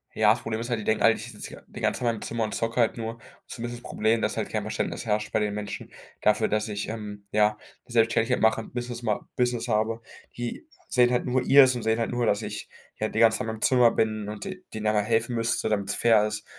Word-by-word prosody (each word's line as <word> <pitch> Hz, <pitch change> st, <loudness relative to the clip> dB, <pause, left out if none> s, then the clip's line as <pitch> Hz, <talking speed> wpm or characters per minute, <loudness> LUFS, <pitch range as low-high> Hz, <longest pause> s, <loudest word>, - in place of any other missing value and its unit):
Ja, 110 Hz, -1 st, +5 dB
das 120 Hz, -, -6 dB
Problem 110 Hz, -1 st, -3 dB
ist 120 Hz, +2 st, -5 dB
halt, 115 Hz, -, 0 dB
die -, -, -6 dB
denken 110 Hz, -, +1 dB
alle, 115 Hz, -, +7 dB
ich 110 Hz, +2 st, -8 dB
sitze 105 Hz, -, -10 dB
die -, -, -10 dB
ganze -, -, 0 dB
Zeit 125 Hz, -, -1 dB
in -, -, +1 dB
meinem 105 Hz, -, -9 dB
Zimmer 115 Hz, -1 st, -2 dB
und 105 Hz, -2 st, -3 dB
zocke 115 Hz, +3 st, -1 dB
halt 115 Hz, -, +1 dB
nur. 115 Hz, 0 st, -5 dB, 0.3 s
Zumindest 120 Hz, +1 st, -6 dB
ist -, -, -21 dB
das -, -, -9 dB
Problem, 110 Hz, +1 st, +1 dB
dass -, -, -1 dB
halt -, -, -2 dB
kein -, -, -2 dB
Verständnis -, -, -3 dB
herrscht 105 Hz, -1 st, -1 dB
bei -, -, +2 dB
den 105 Hz, -1 st, -1 dB
Menschen 105 Hz, 0 st, -6 dB, 0.3 s
dafür, 105 Hz, -, +3 dB
dass 105 Hz, +1 st, 0 dB
ich, 100 Hz, -1 st, -4 dB
ähm, 105 Hz, -2 st, -7 dB
ja, 105 Hz, 0 st, +3 dB, 0.3 s
die -, -, -15 dB
Selbstständigkeit 115 Hz, +1 st, +2 dB
mache, 110 Hz, 0 st, +3 dB
Business 120 Hz, 0 st, -6 dB
ma 110 Hz, -3 st, -1 dB
Business 125 Hz, -1 st, 0 dB
habe. 110 Hz, 0 st, 0 dB, 0.3 s
Die 120 Hz, -, -5 dB, 0.2 s
sehen 125 Hz, -1 st, +4 dB
halt 125 Hz, -, +1 dB
nur 125 Hz, 0 st, +1 dB
ihrs 135 Hz, -2 st, +7 dB
und 120 Hz, -, -4 dB
sehen 110 Hz, +1 st, +1 dB
halt 115 Hz, -, 0 dB
nur, 120 Hz, 0 st, 0 dB
dass 105 Hz, -1 st, +2 dB
ich, -, -, -6 dB, 0.3 s
ja, 110 Hz, -, 0 dB
den 110 Hz, -, -3 dB
ganzen 115 Hz, -1 st, +5 dB
Tag -, -, -3 dB
in -, -, -2 dB
meinem 110 Hz, -, -9 dB
Zimmer 125 Hz, -3 st, +5 dB
bin 110 Hz, -2 st, -1 dB
und 105 Hz, -1 st, -6 dB
den 190 Hz, -1 st, -7 dB
denen 110 Hz, 0 st, -3 dB
aber 105 Hz, -1 st, +2 dB
helfen 115 Hz, +2 st, 0 dB
müsste, 115 Hz, -1 st, 0 dB
damit 100 Hz, -2 st, -1 dB
es 100 Hz, -, -1 dB
fair 110 Hz, -3 st, +4 dB
ist. 105 Hz, 0 st, -4 dB
110 Hz, 265 wpm, -26 LUFS, 105-120 Hz, 0.3 s, alle